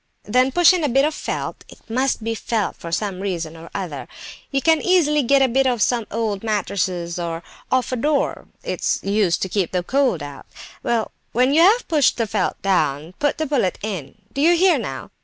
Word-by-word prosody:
Then 255 +5 +2
push 350 +4 +6
in 355 -3 0
a 295 - +1
bit 270 +3 +3
of 310 - 0
felt - - -4
(it - - -17
must 255 0 0
be 225 +1 -1
felt, 225 -1 -2
for 170 - -8
some 195 +1 -2
reason 170 -5 -3
or 165 +1 -11
other); 170 -8 -5 0.4
you 275 - 0
can 320 +1 +3
easily 310 -5 +3
get 275 +1 +4
a - - +4
bit 265 +2 +2
off 245 -2 +1
some 235 -3 0
old 215 -2 -2
mattress, 185 -5 -1
or 170 -1 -4 0.3
off 255 -1 +1
a - - 0
door; 290 +4 0 0.2
it's - - -1
used 200 -3 +1
to - - -1
keep 190 -3 -1
the 180 -1 -1
cold 255 - +1
out. 145 -1 -9 0.3
Well, 230 -2 -1 0.2
when 255 +4 +3
you 320 - +5
have 425 +8 +5
pushed 300 -5 +3
the 230 - +1
felt 205 -3 -1
down, 160 -4 0
put 290 -1 +1
the 315 - -1
bullet 260 -11 0
in; 185 -11 -5 0.2
do 275 - -2
you 340 +3 +5
hear 355 -4 +4
now? 135 - -6
230 Hz, 210 wpm, -21 LUFS, 185-280 Hz, 0.4 s, push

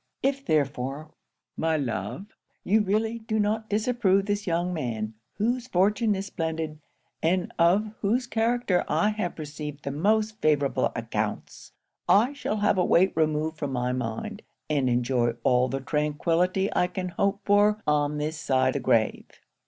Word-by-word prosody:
If 275 0 0
therefore, 145 - -1 0.4
my 160 0 +1
love, 115 - -3 0.4
you 215 +3 +3
really 220 +3 0
do 220 -1 -2
not 220 +1 0
disapprove 210 -3 +2
this 205 0 -2
young 175 +1 0
man, 115 -8 -3 0.2
whose 240 +4 -1
fortune 210 +1 +2
is 195 +1 -3
splendid, 160 -3 -3 0.4
and 175 +2 0
of 195 +6 +3
whose 235 +5 +1
character 230 -5 +1
I 210 - +2
have 210 -5 -3
received 150 -1 -7
the 140 - -3
most 215 +8 +1
favourable 145 -3 +2
accounts, 110 -2 -4 0.4
I 230 +8 +5
shall 265 -6 -3
have 205 -2 +2
a - - +4
weight 185 +2 +4
removed 155 0 0
from 140 -2 -3
my 125 0 0
mind, 125 - -4 0.3
and 140 -4 +2
enjoy 120 -1 +1
all 125 0 +3
the 135 - -2
tranquillity 165 +7 0
I 180 - +3
can 180 0 -4
hope 200 +3 0
for 205 +1 +4
on 150 0 +1
this 150 +1 -3
side 130 -3 +2
the - - -1
grave. 115 -4 +1
170 Hz, 150 wpm, -26 LUFS, 145-210 Hz, 0.4 s, I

